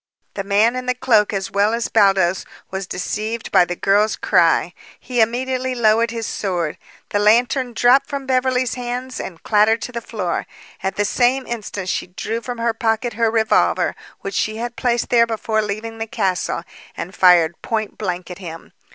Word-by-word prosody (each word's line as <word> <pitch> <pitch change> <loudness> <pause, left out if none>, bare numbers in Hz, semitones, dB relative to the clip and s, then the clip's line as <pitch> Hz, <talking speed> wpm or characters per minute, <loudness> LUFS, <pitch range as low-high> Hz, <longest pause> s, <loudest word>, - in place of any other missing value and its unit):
The 195 - -4
man 210 +4 +3
in 255 0 -4
the 250 - +1
cloak 235 -5 +3
as 195 -2 -3
well 205 +3 +2
as 235 - -2
Baldos 195 -4 +3 0.3
was 190 0 -4
deceived 215 +5 -4
by 180 - +5
the 175 - -4
girl's 205 +4 +2
cry. - - +2 0.3
He 245 -2 -1
immediately 255 +3 0
lowered 230 0 +3
his 230 -1 -4
sword. 175 -8 -2 0.3
The 205 - 0
lantern 240 +4 +3
dropped 245 +4 +4
from 280 -1 -5
Beverly's 255 -1 +1
hands 250 +1 -5
and 170 -4 -7
clattered 215 +1 +3
to - - -5
the 235 -1 -4
floor. 195 -7 -3 0.3
At 190 - -2
the 205 - +1
same 255 +4 +2
instant 205 -5 -5
she - - -2
drew 220 +5 -4
from 245 0 -6
her 230 0 0
pocket 225 +1 -1
her 225 +1 +1
revolver, 220 -1 +2 0.3
which 195 - -5
she 215 +2 -1
had 240 +1 -4
placed 240 -2 0
there 235 -1 +4
before 220 -1 -1
leaving 215 +2 -5
the 225 - -3
castle, 190 -5 -1 0.3
and 180 +3 -5
fired 170 -3 +4
point 220 -2 -3
blank 180 -3 -3
at 180 - -8
him. 165 -3 -9
220 Hz, 180 wpm, -20 LUFS, 195-240 Hz, 0.3 s, by